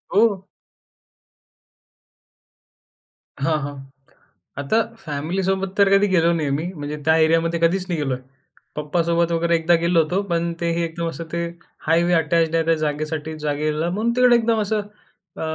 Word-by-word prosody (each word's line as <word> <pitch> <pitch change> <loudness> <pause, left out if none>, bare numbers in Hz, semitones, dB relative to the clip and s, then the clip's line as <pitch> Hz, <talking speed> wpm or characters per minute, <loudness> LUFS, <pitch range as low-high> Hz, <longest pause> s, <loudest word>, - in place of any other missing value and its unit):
हो. 205 -3 +3 3.0
हां, 155 0 +2
हां. 145 +1 -5 0.9
आता 140 +10 0 0.2
फॅमिलीसोबत 185 +4 -2
तर 200 -1 +5
कधी 205 +1 +2
गेलो 170 -1 +4
नाही 150 -3 -1
मी. 145 +3 -1
म्हणजे 150 -2 -5
त्या 160 0 +5
एरियामध्ये 165 +1 +1
कधीच 180 +3 +2
नाही 170 -3 -1
गेलोय. 135 -3 -1 0.6
पप्पासोबत 170 +2 0
वगैरे 170 0 +2
एकदा 165 +1 +3
गेलो 170 -1 +4
होतो. 180 +6 -1
पण 170 0 0
ते 170 0 +1
हे 170 0 -1
एकदम 165 0 -4
असं 165 0 -7
ते 170 - -1 0.5
हायवे 170 +2 +3
अटॅच्ड 165 +1 +1
आहे 165 - +2
त्या 165 - +3
जागेसाठी 155 0 -3
जागेला 150 +2 -1
म्हणून 215 +6 0
तिकडे 250 -1 +6
एकदम 225 -1 +1
असं 210 0 0 0.6
अ, - - -6
170 Hz, 145 wpm, -21 LUFS, 155-185 Hz, 3.0 s, तिकडे